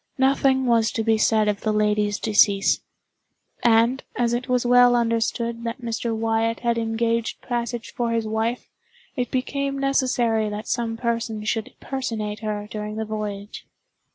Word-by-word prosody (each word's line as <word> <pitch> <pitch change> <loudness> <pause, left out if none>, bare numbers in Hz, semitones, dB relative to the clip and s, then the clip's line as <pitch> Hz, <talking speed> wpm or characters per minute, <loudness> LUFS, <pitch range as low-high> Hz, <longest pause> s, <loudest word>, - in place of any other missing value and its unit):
Nothing 265 0 +3
was 230 -2 +3
to 225 - -1
be 220 -1 +2
said 215 -1 +3
of 205 -1 0
the 215 - 0
lady's 210 -1 +1
decease; 205 -2 +3 0.8
and, 235 +3 +3
as 240 -1 +1
it 245 +2 -2
was 250 -1 +1
well 245 0 +6
understood 230 0 0
that 230 +2 -4
Mr. 230 0 -2
Wyatt 225 0 0
had 235 -1 +1
engaged 230 0 -1
passage 240 -1 -3
for 240 -1 -1
his 230 -1 0
wife, 220 +3 -2 0.5
it 250 -3 -2
became 275 +2 -2
necessary 250 -5 +1
that 210 +1 -6
some 230 -2 -1
person 230 -2 -2
should 220 0 -2
personate 225 -6 -4
her 210 -1 -3
during 210 0 -5
the 220 0 -3
voyage. 210 -1 -6
230 Hz, 155 wpm, -23 LUFS, 215-240 Hz, 0.8 s, well